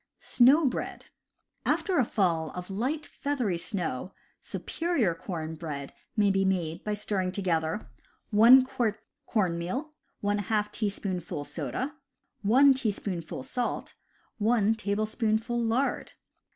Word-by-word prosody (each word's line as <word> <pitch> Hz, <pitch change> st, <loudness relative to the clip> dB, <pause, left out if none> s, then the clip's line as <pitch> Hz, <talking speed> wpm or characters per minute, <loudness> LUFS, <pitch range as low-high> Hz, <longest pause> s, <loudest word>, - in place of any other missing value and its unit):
Snow 275 Hz, +6 st, +5 dB
Bread. 260 Hz, -, -3 dB, 0.3 s
— -, -, -50 dB, 0.2 s
After 370 Hz, -6 st, +1 dB
a -, -, +5 dB
fall 170 Hz, -7 st, +1 dB
of 180 Hz, +1 st, -6 dB
light, 265 Hz, +10 st, -1 dB
feathery 250 Hz, -, -2 dB
snow, 180 Hz, -, -2 dB, 0.3 s
superior 325 Hz, -, -1 dB
corn 165 Hz, -2 st, -5 dB
bread 150 Hz, -4 st, -6 dB, 0.2 s
may 205 Hz, -2 st, +4 dB
be 195 Hz, 0 st, +2 dB
made 175 Hz, -3 st, -1 dB
by 210 Hz, 0 st, -1 dB
stirring 195 Hz, -3 st, -1 dB
together 160 Hz, -, -1 dB, 0.4 s
1 240 Hz, +5 st, +8 dB
quart 230 Hz, -5 st, -1 dB, 0.2 s
corn 185 Hz, -7 st, +1 dB
meal, 260 Hz, -, -4 dB, 0.3 s
^ 205 Hz, +1 st, 0 dB
teaspoonful 190 Hz, -7 st, -3 dB
soda, 150 Hz, -, -4 dB, 0.5 s
1 260 Hz, +7 st, +6 dB
" 195 Hz, -, -3 dB
salt, 245 Hz, -, -3 dB, 0.5 s
1 220 Hz, 0 st, +3 dB
tablespoonful 220 Hz, +2 st, 0 dB
lard. 235 Hz, +5 st, 0 dB
205 Hz, 115 wpm, -28 LUFS, 175-240 Hz, 0.5 s, 1